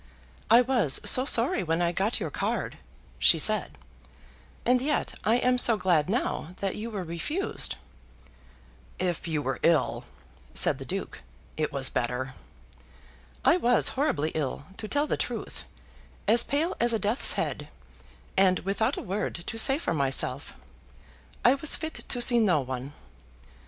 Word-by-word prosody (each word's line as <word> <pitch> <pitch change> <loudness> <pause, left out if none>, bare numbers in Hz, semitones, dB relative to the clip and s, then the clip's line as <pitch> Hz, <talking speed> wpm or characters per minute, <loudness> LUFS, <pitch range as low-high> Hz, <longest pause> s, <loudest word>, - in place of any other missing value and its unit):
"I 230 +3 +7
was 235 - +2
so 255 - +4
sorry 240 -5 +2
when 165 -2 -1
I 170 -1 +1
got 195 +7 -1
your 165 -7 -4
card," - - -3 0.4
she 65 - +5
said; - - +1 0.9
"and 250 +1 +3
yet 295 +2 -1
I 220 - +3
am 250 0 +2
so 230 -2 +4
glad 175 -5 +1
now 190 -6 -2
that 195 -1 -3
you 225 +2 -5
were 205 -4 -5
refused." 175 - -3 1.2
"If 175 -2 -2
you 155 -3 -2
were 135 -2 -3
ill," 165 -5 +1 0.5
said - - +5
the - - -8
Duke, - - -5 0.3
"it 155 -1 -2
was 135 -2 -1
better." 125 +2 -3 1.1
"I - - +5
was 240 +4 +3
horribly 260 - -1
ill, 145 -1 -3
to 215 - -5
tell 290 +6 0
the - - -2
truth; - - -5 0.6
as 235 +2 +5
pale 310 +5 -1
as 235 0 +2
a - - +2
death's 215 +4 +3
head, - - -3 0.7
and 185 -1 +4
without 200 +3 -1
a - - -5
word 200 +3 -3
to 225 - -2
say 270 +4 +4
for 300 - -2
myself. 135 -4 -1 0.9
I 245 - +7
was 285 +2 +1
fit 315 0 -5
to 245 - -1
see 240 -1 +4
no 185 -9 +3
one." 130 +2 -6
200 Hz, 155 wpm, -27 LUFS, 155-245 Hz, 1.2 s, I